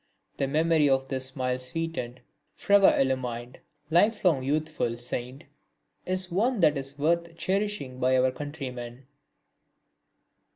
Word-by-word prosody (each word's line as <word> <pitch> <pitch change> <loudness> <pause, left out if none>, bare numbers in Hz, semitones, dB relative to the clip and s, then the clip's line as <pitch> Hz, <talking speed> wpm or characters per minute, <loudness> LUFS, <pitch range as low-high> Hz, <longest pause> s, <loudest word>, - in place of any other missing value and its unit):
The 135 - 0
memory 155 +1 +3
of 135 0 +1
this 130 -1 -1
smile 130 -1 -2
sweetened 130 -2 -4 0.3
fervour 200 -1 +4
illumined 125 -2 -2 0.3
lifelong 180 - +3
youthful 150 -3 -1
saint 125 +2 -5 0.6
is 185 0 -1
one 225 +6 +1
that 150 -2 +5
is 135 0 -5
worth 170 +2 0
cherishing 190 -10 -2
by 130 0 +3
our 130 0 +3
countrymen. 130 -4 -7
140 Hz, 115 wpm, -27 LUFS, 130-165 Hz, 0.6 s, that